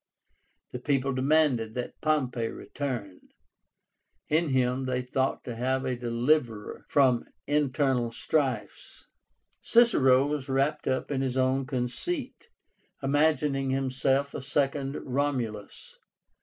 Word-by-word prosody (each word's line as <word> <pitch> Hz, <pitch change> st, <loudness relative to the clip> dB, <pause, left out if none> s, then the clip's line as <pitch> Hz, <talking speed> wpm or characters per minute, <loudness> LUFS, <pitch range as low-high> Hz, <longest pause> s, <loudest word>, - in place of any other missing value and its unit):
The 125 Hz, -, -5 dB
people 135 Hz, 0 st, 0 dB
demanded 130 Hz, -4 st, +2 dB
that 125 Hz, -1 st, -5 dB
Pompey 130 Hz, -7 st, 0 dB
return. 115 Hz, -9 st, -5 dB, 1.1 s
In 160 Hz, +1 st, +2 dB
him 130 Hz, 0 st, +1 dB
they 125 Hz, 0 st, -1 dB
thought 130 Hz, +1 st, -1 dB
to 120 Hz, -, -6 dB
have 130 Hz, +3 st, -1 dB
a 130 Hz, -, -1 dB
deliverer 120 Hz, -1 st, -1 dB
from 130 Hz, -4 st, +3 dB, 0.2 s
internal 135 Hz, -4 st, +1 dB
strifes. 135 Hz, 0 st, -2 dB, 0.6 s
Cicero 140 Hz, -, +5 dB
was 145 Hz, -2 st, -3 dB
wrapped 135 Hz, +3 st, 0 dB
up 130 Hz, +2 st, -1 dB
in 135 Hz, -2 st, 0 dB
his 130 Hz, -1 st, -1 dB
own 130 Hz, +1 st, +1 dB
conceit, 255 Hz, -, -3 dB, 0.5 s
imagining 145 Hz, -1 st, +2 dB
himself 135 Hz, +1 st, 0 dB
a -, -, -5 dB
second 140 Hz, 0 st, -1 dB
Romulus. 125 Hz, -6 st, -3 dB
135 Hz, 110 wpm, -28 LUFS, 125-145 Hz, 1.1 s, Cicero